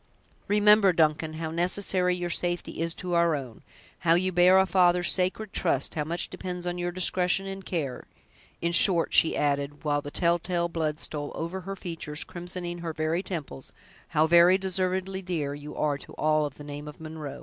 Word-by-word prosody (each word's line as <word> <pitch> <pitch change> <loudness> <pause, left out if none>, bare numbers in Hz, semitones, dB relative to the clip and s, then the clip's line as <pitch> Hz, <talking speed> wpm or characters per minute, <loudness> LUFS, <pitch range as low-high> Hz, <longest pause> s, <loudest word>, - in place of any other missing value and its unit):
"Remember, 210 -2 +5
Duncan, 155 -1 +1
how 160 0 -4
necessary 180 +1 +2
your 175 -1 -3
safety 175 -1 -2
is 165 0 0
to 180 -1 -5
our 170 -2 +3
own—how 140 +5 -3
you 185 +2 +1
bear 180 +1 +5
a 190 - +5
father's 180 -2 +3
sacred 190 +3 -1
trust—how 150 -2 0
much 170 +3 -2
depends 180 -1 -5
on 175 0 -3
your 175 0 -2
discretion 180 +1 +1
and 195 0 -6
care—in 165 +1 -6
short," 170 0 +4
she 160 - +4
added, 145 0 -1
while 145 -1 0
the 145 - -7
telltale 170 +1 0
blood 155 -2 -2
stole 145 -1 -4
over 170 +3 -4
her 195 +2 -6
features, 165 -5 -5
crimsoning 175 0 -6
her 165 -1 -4
very 155 +3 -1
temples, 155 - -7 0.4
"how 155 - +2
very 170 +3 +6
deservedly 190 0 -2
dear 165 -6 -3
you 145 +1 -9
are 145 -2 0
to - - -13
all 155 -1 +1
of 140 - -12
the 145 - -11
name 145 +1 -8
of 150 - -10
Munro." 155 -3 -7
170 Hz, 175 wpm, -27 LUFS, 155-180 Hz, 0.4 s, very